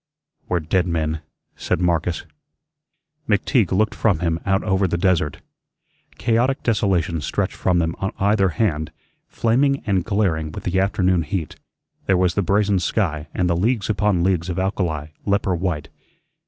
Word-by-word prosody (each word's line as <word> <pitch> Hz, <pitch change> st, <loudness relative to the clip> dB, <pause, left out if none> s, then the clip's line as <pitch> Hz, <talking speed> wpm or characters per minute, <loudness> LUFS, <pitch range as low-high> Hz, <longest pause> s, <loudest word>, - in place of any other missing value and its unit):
"We're 90 Hz, -2 st, +1 dB
dead 90 Hz, +3 st, +1 dB
men," 80 Hz, -2 st, -1 dB, 0.3 s
said -, -, -1 dB
Marcus. 85 Hz, -1 st, 0 dB, 1.0 s
McTeague 105 Hz, -1 st, +2 dB
looked 105 Hz, +2 st, +2 dB
from 100 Hz, -3 st, +2 dB
him 85 Hz, 0 st, -1 dB
out 95 Hz, 0 st, +2 dB
over 95 Hz, -1 st, +1 dB
the 85 Hz, -, -1 dB
desert. 85 Hz, -5 st, +1 dB, 0.8 s
Chaotic 120 Hz, +4 st, +1 dB
desolation 95 Hz, -7 st, +1 dB
stretched -, -, -1 dB
from 90 Hz, -1 st, +1 dB
them 80 Hz, -1 st, 0 dB
on 95 Hz, -, -1 dB
either 100 Hz, -1 st, +3 dB
hand, 80 Hz, -3 st, -1 dB, 0.4 s
flaming 135 Hz, +4 st, +1 dB
and 95 Hz, -5 st, +1 dB
glaring 85 Hz, -7 st, 0 dB
with -, -, -7 dB
the 95 Hz, +1 st, 0 dB
afternoon 95 Hz, -2 st, +2 dB
heat. 80 Hz, 0 st, -4 dB, 0.5 s
There 95 Hz, -, +4 dB
was 90 Hz, -1 st, +2 dB
the 100 Hz, -, +1 dB
brazen 100 Hz, +1 st, +2 dB
sky 80 Hz, -5 st, -1 dB
and 90 Hz, -, +1 dB
the 85 Hz, -, +1 dB
leagues 110 Hz, +4 st, +1 dB
upon 100 Hz, -3 st, +1 dB
leagues 90 Hz, -1 st, +1 dB
of 85 Hz, -, -3 dB
alkali, 90 Hz, -6 st, -1 dB
leper 100 Hz, -1 st, +1 dB
white. 85 Hz, -4 st, -2 dB
95 Hz, 155 wpm, -21 LUFS, 85-100 Hz, 1.0 s, There